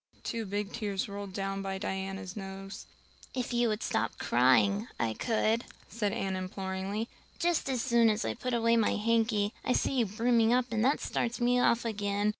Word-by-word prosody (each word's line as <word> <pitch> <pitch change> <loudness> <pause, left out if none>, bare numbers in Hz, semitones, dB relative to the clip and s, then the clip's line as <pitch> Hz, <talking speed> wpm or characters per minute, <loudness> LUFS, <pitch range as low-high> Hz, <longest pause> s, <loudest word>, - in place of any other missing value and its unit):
Two 230 -2 -3
big 205 +1 -3
tears 205 -4 -2
rolled 200 -1 -6
down 195 0 -3
by 195 0 -3
Diana's 190 -1 -4
nose. 195 -1 -7 0.5
"If 250 -1 -2
you 240 0 +3
would 215 -1 -1
stop 115 - -1
crying 195 - +3
I 115 -2 +1
could," 225 - +1 0.2
said 210 -3 -1
Anne 195 -4 -2
imploringly. 190 +3 -3 0.3
"Just 345 -5 +1
as 255 -3 0
soon 235 -3 +4
as 210 - 0
I 110 - 0
put 250 - -2
away 230 0 +3
my 225 - +2
hanky 220 -1 +1
I 250 - +1
see 265 - +1
you 230 - +2
brimming 230 +2 +3
up 250 0 +3
and 220 -1 +1
that 275 +4 +3
starts 235 0 -1
me 245 +1 +3
off 235 -1 +3
again. 205 -1 0
210 Hz, 185 wpm, -30 LUFS, 195-235 Hz, 0.5 s, soon